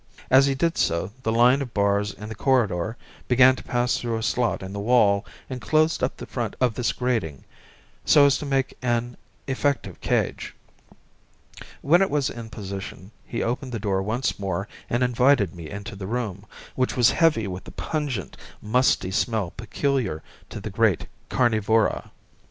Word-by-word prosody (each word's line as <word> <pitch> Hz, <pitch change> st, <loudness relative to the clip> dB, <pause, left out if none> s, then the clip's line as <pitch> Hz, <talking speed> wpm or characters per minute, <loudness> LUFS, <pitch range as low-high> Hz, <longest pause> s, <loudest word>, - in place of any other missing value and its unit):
As 135 Hz, +1 st, +7 dB
he 135 Hz, -, +1 dB
did 165 Hz, +5 st, 0 dB
so 85 Hz, +4 st, 0 dB
the 110 Hz, -, -1 dB
line 120 Hz, +4 st, +4 dB
of 125 Hz, -4 st, -6 dB
bars 100 Hz, 0 st, +2 dB
in 105 Hz, -, -9 dB
the 110 Hz, -, -6 dB
corridor 110 Hz, -4 st, +1 dB, 0.3 s
began 130 Hz, +1 st, +6 dB
to -, -, -9 dB
pass 120 Hz, 0 st, 0 dB
through 115 Hz, -2 st, -2 dB
a 110 Hz, -, -4 dB
slot 120 Hz, -3 st, 0 dB
in 95 Hz, +1 st, -7 dB
the 100 Hz, -, -4 dB
wall 105 Hz, -2 st, +3 dB, 0.2 s
and 130 Hz, -1 st, -6 dB
closed 155 Hz, +8 st, +2 dB
up 130 Hz, -, -1 dB
the -, -, -7 dB
front 120 Hz, -5 st, -4 dB
of 125 Hz, -3 st, +2 dB
this 120 Hz, +1 st, 0 dB
grating, 115 Hz, -, -2 dB, 0.6 s
so 145 Hz, -1 st, +6 dB
as 140 Hz, -, +4 dB
to -, -, -5 dB
make 135 Hz, -1 st, 0 dB
an 120 Hz, -1 st, -1 dB, 0.3 s
effective 140 Hz, +1 st, -1 dB
cage. -, -, -1 dB, 1.3 s
When 170 Hz, +6 st, +5 dB
it 195 Hz, -, +3 dB
was 145 Hz, -2 st, 0 dB
in 115 Hz, -1 st, -8 dB
position 100 Hz, -3 st, -7 dB, 0.2 s
he 115 Hz, -, -2 dB
opened 125 Hz, +2 st, -3 dB
the -, -, -1 dB
door 95 Hz, -2 st, 0 dB
once 110 Hz, +6 st, -2 dB
more 95 Hz, 0 st, -2 dB, 0.2 s
and 120 Hz, +2 st, +1 dB
invited 125 Hz, -, +3 dB
me 85 Hz, -3 st, -9 dB
into 100 Hz, -1 st, -7 dB
the 95 Hz, -1 st, -6 dB
room, 110 Hz, -3 st, -4 dB, 0.3 s
which 130 Hz, 0 st, -1 dB
was 120 Hz, -1 st, +5 dB
heavy 155 Hz, -10 st, +3 dB
with 95 Hz, -1 st, -6 dB
the -, -, -10 dB
pungent, 145 Hz, -, -3 dB, 0.2 s
musty 110 Hz, -4 st, +1 dB
smell 110 Hz, -3 st, 0 dB
peculiar 115 Hz, -, -2 dB, 0.3 s
to -, -, -7 dB
the -, -, -6 dB
great -, -, +2 dB, 0.2 s
carnivora. 110 Hz, -2 st, +1 dB
120 Hz, 175 wpm, -24 LUFS, 100-130 Hz, 1.3 s, As